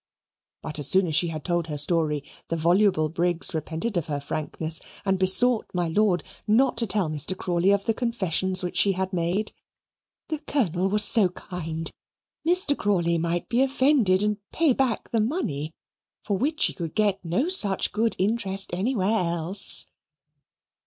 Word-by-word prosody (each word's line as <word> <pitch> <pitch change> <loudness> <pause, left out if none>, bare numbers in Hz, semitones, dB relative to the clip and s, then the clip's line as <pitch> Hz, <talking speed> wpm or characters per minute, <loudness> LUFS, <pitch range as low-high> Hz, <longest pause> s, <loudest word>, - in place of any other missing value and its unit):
But 155 -1 -4
as 145 - +4
soon 190 +5 +5
as 160 - -4
she 175 - +2
had 155 -3 -6
told 175 -2 -1
her 150 -2 -5
story, 150 -1 +1 0.2
the 165 - -2
voluble 170 0 +2
Briggs 175 +3 +3
repented 165 +6 -3
of 170 - -2
her 145 -2 -3
frankness 155 +2 -2 0.2
and 190 -1 0
besought 220 +6 +4
my 175 -2 -1
lord 195 0 +1 0.2
not 245 +5 +3
to 230 -1 +1
tell 195 -3 +2
Mr. 155 +5 -4
Crawley 175 +1 0
of 200 0 +1
the 225 - +1
confessions 190 -6 +1
which 180 - -4
she 200 - +4
had 190 +1 -4
made. 180 +5 -1 0.8
"The 310 -2 -3
Colonel 195 - -1
was 210 +2 +2
so 205 -3 +5
kind 165 -3 -6 0.6
Mr. 350 -4 +3
Crawley 170 -7 0
might 170 +1 -2
be 240 +2 +1
offended 260 -8 +2
and 210 0 0
pay 315 -5 +2
back 255 -3 -2
the 225 - +1
money, 165 - -3 0.5
for 205 - -1
which 295 +10 -2
she - - +3
could 165 -3 -7
get 205 -3 0
no 180 - -1
such 210 - +4
good 225 +1 0
interest 195 -1 -1
anywhere 200 +1 0
else." 175 +2 -2
190 Hz, 165 wpm, -24 LUFS, 170-215 Hz, 0.8 s, soon